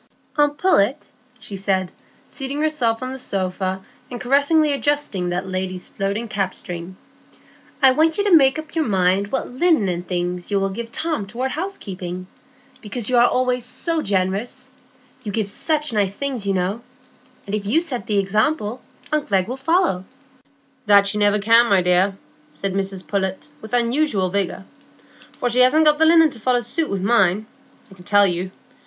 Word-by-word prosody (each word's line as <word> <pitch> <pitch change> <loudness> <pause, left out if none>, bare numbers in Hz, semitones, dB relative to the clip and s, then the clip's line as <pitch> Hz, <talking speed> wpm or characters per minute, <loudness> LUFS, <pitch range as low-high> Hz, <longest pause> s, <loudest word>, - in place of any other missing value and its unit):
"Aunt 290 -1 +2
Pullet," 280 - +2 0.3
she 205 - -8
said, 190 -2 -1 0.4
seating 275 +1 -4
herself 255 -7 0
on 255 0 -4
the 265 - -7
sofa, 190 -3 -3 0.2
and 245 - -6
caressingly 285 +4 +3
adjusting 280 -9 -1
that 180 +2 -3
lady's 185 -1 -4
floating 200 +4 -3
cap 195 -3 -2
string, 175 +1 -7 0.9
"I 265 - +8
want 315 +4 +2
you 405 - +1
to 405 -4 +5
make 270 -2 +5
up 310 0 -8
your 320 -4 0
mind 190 0 +2
what 265 - -2
linen 310 - +2
and 175 0 -4
things 180 0 -3
you 200 -1 +1
will 195 0 -1
give 230 +3 -6
Tom 310 -11 -3
toward 250 +5 -3
housekeeping; 190 - -5 0.6
because 220 +2 -4
you 250 - +3
are 240 - +6
always 250 -1 0
so 325 +6 -2
generous,—you 245 +4 -5
give 215 0 -1
such 300 +1 -2
nice 200 -2 0
things, 260 -6 -3
you 195 - +1
know; 190 +5 -1 0.6
and 200 - -7
if 205 -1 -2
you 255 +10 +3
set 275 -9 -4
the 210 -3 0
example, 215 +4 0 0.3
aunt 305 -1 0
Glegg 190 -2 +2
will 250 - -4
follow." 300 - +1 0.8
"That 200 -1 +6
she 210 +1 -1
never 205 0 +4
can, 230 +3 +5
my 195 -4 +3
dear," 180 +2 +2 0.3
said 195 -1 -3
Mrs 195 -3 -3
Pullet, 190 +2 -2
with 220 - -10
unusual 240 -5 +1
vigor, 195 -1 -2 0.7
"for - - -2
she 245 +1 +1
hasn't 300 +5 +5
got 300 0 +4
the 320 - +5
linen 325 -2 +6
to 245 - -11
follow 245 +2 +1
suit 310 +7 -1
wi' 195 - -1
mine, 200 0 +2 0.5
I - - -12
can 185 -2 -15
tell 205 +2 +5
you. 180 0 -1
215 Hz, 175 wpm, -21 LUFS, 190-270 Hz, 0.9 s, I